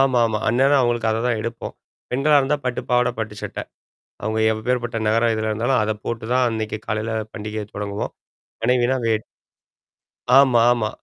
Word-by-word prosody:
ஆமாமா. 120 Hz, -5 st, +3 dB
அந்நேரம் 135 Hz, +5 st, +4 dB
அவங்களுக்கு 120 Hz, -2 st, +1 dB
அததான் 115 Hz, +1 st, 0 dB
எடுப்போம். 115 Hz, +1 st, -5 dB, 0.4 s
பெண்களா 140 Hz, +4 st, +3 dB
இருந்தா 140 Hz, +2 st, +1 dB
பட்டு 125 Hz, -1 st, -1 dB
பாவாட, 125 Hz, 0 st, +3 dB
பட்டு 110 Hz, -1 st, -4 dB
சட்ட. -, -, -6 dB, 0.6 s
அவுங்க 110 Hz, +1 st, -1 dB
யபேர்ப்பட்ட 120 Hz, +2 st, -1 dB
நகர 115 Hz, +2 st, +3 dB
இதுல 110 Hz, 0 st, -2 dB
இருந்தாலும் 115 Hz, +4 st, +1 dB
அத 110 Hz, 0 st, 0 dB
போட்டு 115 Hz, -1 st, -4 dB
தான் 125 Hz, 0 st, +3 dB
அன்னைக்கு 110 Hz, -1 st, -3 dB
காலையில 110 Hz, +1 st, -2 dB, 0.2 s
பண்டிகைய 105 Hz, 0 st, -5 dB
தொடங்குவோம். 100 Hz, 0 st, -4 dB, 0.5 s
மனைவினா 125 Hz, +2 st, +2 dB
வேட் 110 Hz, -1 st, 0 dB, 1.1 s
ஆமா 130 Hz, -4 st, +5 dB
ஆமா. 115 Hz, -3 st, 0 dB
115 Hz, 145 wpm, -22 LUFS, 110-125 Hz, 1.1 s, ஆமா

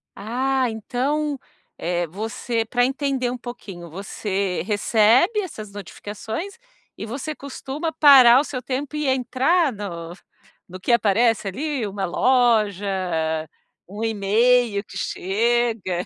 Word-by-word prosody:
Ah, 255 Hz, +4 st, 0 dB
então, 275 Hz, +6 st, -2 dB, 0.4 s
eh, 175 Hz, 0 st, -1 dB
você 225 Hz, +5 st, -3 dB
para 245 Hz, +2 st, +2 dB
entender 265 Hz, -2 st, -1 dB
um 250 Hz, -, -4 dB
pouquinho, 205 Hz, -8 st, -9 dB
você 195 Hz, +1 st, -3 dB
recebe 225 Hz, -, +3 dB
essas 215 Hz, -, -8 dB
notificações 220 Hz, -, -7 dB, 0.4 s
e -, -, -7 dB
você 275 Hz, +7 st, -5 dB
costuma 280 Hz, +3 st, -5 dB
parar 270 Hz, -6 st, +8 dB
o -, -, +1 dB
seu 265 Hz, -3 st, -5 dB
tempo 270 Hz, +4 st, -4 dB
e 300 Hz, -1 st, -1 dB
entrar 265 Hz, +4 st, +2 dB
no 170 Hz, -5 st, -6 dB, 0.6 s
no 185 Hz, +1 st, -9 dB
que 185 Hz, -, -1 dB
aparece 225 Hz, -1 st, +2 dB
ali 275 Hz, +3 st, -3 dB
uma 200 Hz, -1 st, -3 dB
loja, 215 Hz, -2 st, +2 dB, 1.0 s
um 205 Hz, +4 st, -6 dB
email 225 Hz, +1 st, +2 dB
que -, -, -10 dB
chega? 220 Hz, -2 st, 0 dB
235 Hz, 120 wpm, -22 LUFS, 205-265 Hz, 1.0 s, parar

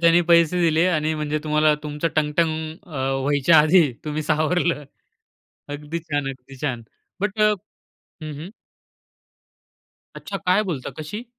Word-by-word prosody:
त्यानी 170 Hz, +1 st, +5 dB
पैसे 170 Hz, +1 st, +4 dB
दिले 165 Hz, 0 st, +3 dB
आणि 155 Hz, -2 st, 0 dB
म्हणजे 150 Hz, 0 st, -2 dB
तुम्हाला 155 Hz, 0 st, +3 dB
तुमचं 150 Hz, +2 st, -2 dB
टंग, 150 Hz, -1 st, +1 dB
टंग 160 Hz, -1 st, 0 dB
अ, 135 Hz, -5 st, -2 dB
व्हायच्या 145 Hz, +3 st, +4 dB
आधी 155 Hz, -2 st, +5 dB
तुम्ही 150 Hz, 0 st, -3 dB
सावरलं. 155 Hz, 0 st, 0 dB, 0.8 s
अगदी 150 Hz, +3 st, -5 dB
छान, 145 Hz, -4 st, -3 dB
अगदी 135 Hz, 0 st, -10 dB
छान. 125 Hz, -5 st, -2 dB, 0.4 s
बट 205 Hz, +1 st, -2 dB
अ 210 Hz, -, +5 dB, 0.7 s
हं, 155 Hz, -1 st, -6 dB
हं. 170 Hz, +5 st, -7 dB, 1.7 s
अच्छा. 200 Hz, -, -6 dB
काय 190 Hz, +2 st, +2 dB
बोलता 165 Hz, -10 st, -4 dB
कशी? 205 Hz, +10 st, -6 dB
155 Hz, 135 wpm, -22 LUFS, 150-170 Hz, 1.7 s, त्यानी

